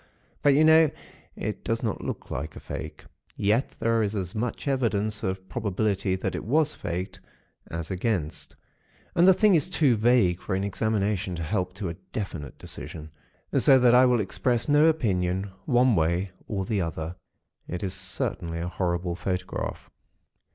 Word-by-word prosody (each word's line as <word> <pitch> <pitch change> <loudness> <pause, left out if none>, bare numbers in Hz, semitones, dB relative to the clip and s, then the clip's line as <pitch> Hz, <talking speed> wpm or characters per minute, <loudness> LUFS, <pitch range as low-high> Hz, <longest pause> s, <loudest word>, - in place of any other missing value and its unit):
But, 145 -1 +5
you 155 - +5
know, 160 0 +7 0.5
it - - -4
does - - -1
not - - -2
look - - -5
like 75 +2 -4
a - - -7
fake. - - -7 0.3
Yet, 105 +6 +1
there 115 0 +2
is 105 0 -1
as 95 -3 -3
much 115 +5 -3
evidence 110 -6 0
of 95 0 -3
probability 100 -3 0
that 95 - -3
it - - -4
was 150 +6 +2
faked, 90 +2 -4 0.5
as 85 +1 -4
against; 95 -5 -2 0.6
and 175 +2 +5
the 190 - +9
thing 210 0 +5
is 165 +1 +2
too 145 -9 +3
vague 110 -6 +3
for 95 - -3
an 95 - -1
examination 100 -2 -1
to 85 - -4
help 90 +1 -1
to 95 -1 -4
a - - -4 0.2
definite 85 -9 -5
decision; 80 -1 -9 0.4
so 135 - +6
that 125 -2 +5
I 125 +1 +7
will 120 -3 +3
express 115 +4 0
no 150 +1 +5
opinion, 95 - 0
one 125 -3 +4
way 85 +3 +1 0.2
or 95 -3 -2
the 105 -3 0
other. 80 0 -4 0.5
It 90 +2 -4
is 95 -1 -2
certainly 85 -2 -3
a 85 +1 -3
horrible 90 -1 -1
photograph. 90 +1 -4
100 Hz, 165 wpm, -26 LUFS, 90-125 Hz, 0.6 s, the